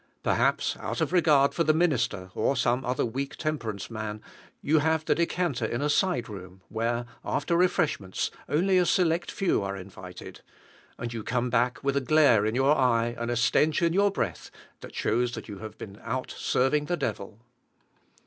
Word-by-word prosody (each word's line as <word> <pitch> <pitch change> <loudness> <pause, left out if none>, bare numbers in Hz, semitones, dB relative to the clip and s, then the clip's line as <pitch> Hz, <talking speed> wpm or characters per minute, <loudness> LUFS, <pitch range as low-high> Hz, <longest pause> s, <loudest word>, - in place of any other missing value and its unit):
Perhaps, - - +1
out - - -4
of - - -1
regard 150 -6 +4
for 165 - +1
the 155 -1 +3
minister, 120 - 0
or 140 - +1
some 125 +1 +1
other 125 +1 0
weak 135 +4 -4
temperance 115 - -4
man, 110 -1 -5 0.4
you 155 +2 +2
have 160 +1 +1
the - - +3
decanter 170 -6 -1
in 120 +2 -1
a 150 - +2
side 175 - +1
room, 95 -2 -10
where, 120 +2 -1 0.2
after 170 +4 -1
refreshments, 165 - 0 0.2
only 180 +6 +3
a 180 - +3
select 175 -1 +2
few 190 - 0
are 100 0 -3
invited; 90 -1 -10 0.6
and 120 0 -5
you 115 - -4
come 125 +1 -1
back 125 +2 +1
with 140 0 0
a 140 - +2
glare 130 -7 +4
in 110 - -1
your 135 +3 +4
eye, 120 -3 +2
and 120 0 -2
a 120 - 0
stench 150 +8 +2
in 165 -1 +2
your 200 +2 +4
breath, 115 - -3 0.3
that - - -11
shows 120 +2 0
that - - -7
you 100 -3 -8
have 110 0 -9
been 100 0 -9
out 125 +3 -3
serving 140 +4 +1
the 175 +3 -1
devil. 105 -4 -4
125 Hz, 185 wpm, -27 LUFS, 110-155 Hz, 0.6 s, regard